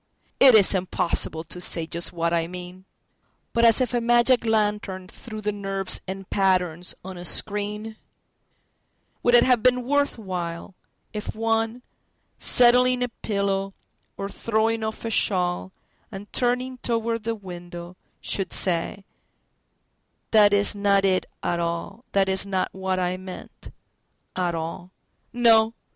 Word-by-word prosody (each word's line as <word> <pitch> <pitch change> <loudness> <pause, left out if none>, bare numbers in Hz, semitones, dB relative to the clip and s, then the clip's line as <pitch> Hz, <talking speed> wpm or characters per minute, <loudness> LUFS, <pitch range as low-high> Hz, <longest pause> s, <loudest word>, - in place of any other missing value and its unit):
—It 260 -4 +8
is 205 -2 +6
impossible 175 -3 -1
to 170 +2 -7
say 165 -2 +3
just 170 +1 -2
what 170 0 -1
I 165 -1 +1
mean! 180 +1 -9 0.7
But 235 0 +3
as 230 +1 +5
if 250 -2 -1
a 240 - +1
magic 240 +1 +3
lantern 210 -4 -1
threw 215 +2 -8
the 210 0 -1
nerves 195 -1 -1
in 195 +1 -6
patterns 180 -3 0
on 190 -1 -7
a 175 - -8
screen:Would 210 +4 -5
it 240 - +7
have 250 -3 +3
been 250 +1 +3
worth 285 +2 0
whileIf 185 +2 -7
one, 225 +2 -1 0.6
settling 250 +1 +4
a 245 - -2
pillow 200 -3 -2 0.4
or 195 - -4
throwing 220 +2 -1
off 220 +1 -5
a 225 - -2
shawl, 180 -3 +1 0.4
And 200 0 -10
turning 250 +1 -1
toward 230 -1 -1
the 230 +1 -2
window, 175 -3 -9 0.3
should 195 - -2 1.8
say:"That 210 -2 +6
is 205 0 +4
not 200 -1 +2
it 185 -1 +1 0.2
at 175 - -1
all, 170 +8 -4
That 195 -1 +3
is 190 0 +1
not 190 -2 -1
what 190 0 -2
I 180 0 -1
meant, 185 0 -10 0.7
at 175 -2 -1
all."……..No! 220 +7 0
200 Hz, 130 wpm, -24 LUFS, 185-225 Hz, 1.8 s, It